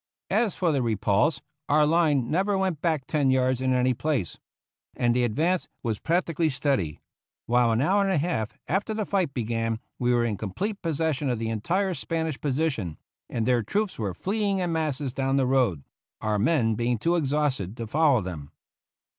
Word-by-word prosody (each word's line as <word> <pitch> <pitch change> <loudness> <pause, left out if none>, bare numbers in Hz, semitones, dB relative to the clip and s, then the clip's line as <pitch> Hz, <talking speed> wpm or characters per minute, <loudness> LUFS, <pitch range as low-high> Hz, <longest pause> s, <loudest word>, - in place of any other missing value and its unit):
As 225 -6 +2
for 175 -3 +1
the 140 -3 +1
"repulse," 115 +6 +1 0.3
our 150 +1 +5
line 150 -5 +2
never 195 +4 +1
went 185 -6 -1
back 160 -6 0
ten 145 -4 +1
yards 130 -1 +2
in 130 0 +1
any 125 0 +3
place, 130 - -2 0.6
and 120 -1 +1
the 125 - +2
advance 160 +10 +1 0.2
was 110 -3 -1
practically 165 -1 +1
steady; 135 - -1 0.5
while 120 0 +3
an 115 +2 +2
hour 195 +6 +3
and 195 -1 +1
a 190 - +2
half 140 -7 -2
after 200 +6 -1
the 215 -1 -1
fight 190 -8 0
began 115 -2 -2 0.2
we 125 0 +2
were 120 -1 +3
in 110 -3 -1
com 100 -2 -5
plete 205 - -3
possession 155 -4 -1
of 120 - 0
the 115 0 -2
entire 180 - 0
Spanish 160 -4 -3
position, 130 - -1 0.3
and 115 -2 -1
their 125 -1 +3
troops 200 - -2
were 100 -5 -2
fleeing 200 - 0
in 180 -2 -1
masses 150 -5 -1
down 135 0 0
the 135 - +3
road, 125 - +1 0.4
our 110 -1 0
men 115 -1 +2
being 120 +2 0
too 170 +11 +1
exhausted 140 - 0
to 115 - -4
follow 140 0 +3
them. 80 -6 -6
135 Hz, 185 wpm, -26 LUFS, 115-165 Hz, 0.6 s, our